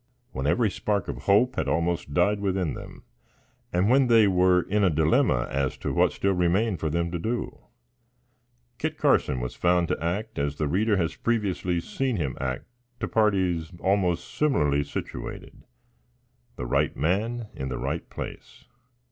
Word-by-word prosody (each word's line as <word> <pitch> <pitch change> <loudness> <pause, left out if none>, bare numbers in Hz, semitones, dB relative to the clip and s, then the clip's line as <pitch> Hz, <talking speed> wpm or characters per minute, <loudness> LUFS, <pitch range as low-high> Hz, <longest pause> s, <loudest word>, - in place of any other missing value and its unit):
When 65 +2 -3
every 110 +6 +2
spark 100 -2 -1
of 65 - -4
hope 120 +6 +3
had - - 0
almost 85 -3 -1
died 105 +7 +2
within 95 -5 -1
them, - - -10 0.7
and 90 +3 +2
when 130 +2 +4
they 115 -3 +6
were 90 -1 +4
in 105 +1 0
a 95 - +5
dilemma 75 -6 +2
as 70 0 -1
to - - -3
what - - +3
still 100 0 0
remained 90 +3 +1
for 80 - -1
them 85 +2 -1
to 85 - -3
do, 115 +7 -3 1.2
Kit - - -2
Carson 65 - +2
was 60 0 -4
found 90 -1 +2
to - - -2
act 105 +7 -2
as 70 0 -1
the 75 0 -1
reader 100 +7 +2
has 85 -2 -1
previously 95 -6 0
seen 125 +8 -2
him 75 -8 -2
act 65 -1 -3 0.3
to - - -2
parties 95 -7 +1
almost 95 -3 0
similarly 75 - +2
situated 70 - -7 0.9
the 60 - -5
right - - 0
man 110 +8 -1
in 65 0 -5
the 65 - -3
right - - -3
place. - - -8
90 Hz, 165 wpm, -26 LUFS, 80-105 Hz, 1.2 s, they